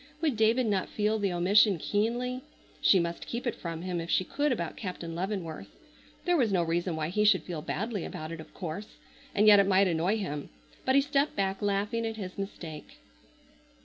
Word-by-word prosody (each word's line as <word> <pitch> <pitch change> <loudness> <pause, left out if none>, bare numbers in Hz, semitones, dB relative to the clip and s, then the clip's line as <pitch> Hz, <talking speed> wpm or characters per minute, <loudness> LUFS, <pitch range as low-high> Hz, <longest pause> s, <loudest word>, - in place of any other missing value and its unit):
Would 305 -5 +1
David 225 +3 +3
not 200 -4 0
feel 215 +1 0
the 200 -2 0
omission 190 +3 +4
keenly? 240 +8 -1 0.4
She 190 - +6
must 170 0 -3
keep 235 +2 -4
it 240 - 0
from 165 -1 -6
him 180 -2 -2
if 165 - -7
she 185 - +3
could 290 +9 0
about 170 -9 -2
Captain 180 -4 -5
Leavenworth. 175 -2 -4 0.6
There 355 -1 +3
was 245 -9 +2
no 180 -3 +2
reason 170 +1 -1
why 155 0 -2
he 210 +4 +1
should 210 -3 +4
feel 170 -4 -5
badly 205 +4 -3
about 155 +1 -6
it, 165 - -6
of 160 - -11
course, 185 +3 -7 0.4
and 210 - +4
yet 210 -1 +9
it 200 - +4
might 195 0 +5
annoy 175 +5 +1
him. 150 -9 -4 0.4
But 260 - +3
he 275 - +7
stepped 285 +1 +1
back 195 -1 -1
laughing 205 +3 0
at 225 - -4
his 185 -3 -6
mistake. 165 -6 -7
195 Hz, 200 wpm, -29 LUFS, 170-220 Hz, 0.6 s, yet